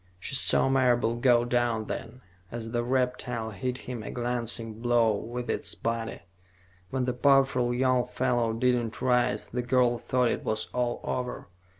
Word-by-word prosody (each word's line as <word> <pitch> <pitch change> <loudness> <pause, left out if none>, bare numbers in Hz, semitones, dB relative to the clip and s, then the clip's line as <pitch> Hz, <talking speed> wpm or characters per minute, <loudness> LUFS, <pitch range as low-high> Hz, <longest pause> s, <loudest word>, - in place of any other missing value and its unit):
She 100 - -4
saw 135 - +3
Marable 125 -3 +2
go 120 -1 +4
down, 120 -2 0
then, 115 +4 -6 0.3
as 115 -1 -5
the 120 0 0
reptile 125 -2 -1
hit 125 +6 -3
him 125 -3 -6
a - - -7
glancing 120 -2 -2
blow 120 -3 +3
with 120 +4 -5
its - - 0
body. 115 -1 -3 0.7
When 130 -1 -1
the 125 - -1
powerful 135 -1 +3
young 125 0 +2
fellow 120 -3 0
did 125 +3 +2
not 120 -2 -2
rise, 125 -1 +1
the 125 - 0
girl 125 -1 +2
thought 125 0 +1
it - - -3
was 110 0 -2
all 120 -1 -1
over. 125 -4 -4
120 Hz, 165 wpm, -28 LUFS, 115-125 Hz, 0.7 s, go